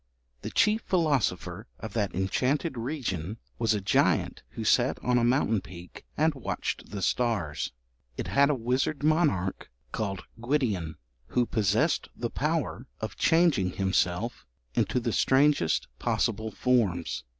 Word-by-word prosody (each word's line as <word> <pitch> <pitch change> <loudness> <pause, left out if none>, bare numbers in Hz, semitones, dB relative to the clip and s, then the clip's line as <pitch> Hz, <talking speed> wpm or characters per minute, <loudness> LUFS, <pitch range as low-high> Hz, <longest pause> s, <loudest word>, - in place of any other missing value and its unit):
The - - -4
chief 215 +1 +3
philosopher 145 - 0
of 110 -2 -7
that 105 -4 -1
enchanted 130 - 0
region 115 - -3 0.2
was 115 -2 +2
a 105 - -2
giant 95 - +2
who - - -4
sat - - +3
on 125 0 +3
a - - +1
mountain 120 -4 +2
peak 90 +1 -11
and 155 +1 +3
watched 135 -4 -4
the 100 -1 -5
stars. 110 -12 0 0.5
It - - -3
had 140 +1 +3
a 150 - +2
wizard 130 +5 -1
monarch 150 - +1 0.2
called 100 -4 -3 0.2
Gwydion, 115 - 0 0.3
who 125 -1 +1
possessed 110 - +1
the 120 -1 -3
power 150 -4 -1
of 110 -3 -5
changing 160 - +3
himself 95 - 0 0.3
into 125 - +1
the 120 -2 -2
strangest 135 - +3
possible 110 0 0
forms. 105 - 0
115 Hz, 135 wpm, -28 LUFS, 95-140 Hz, 0.5 s, chief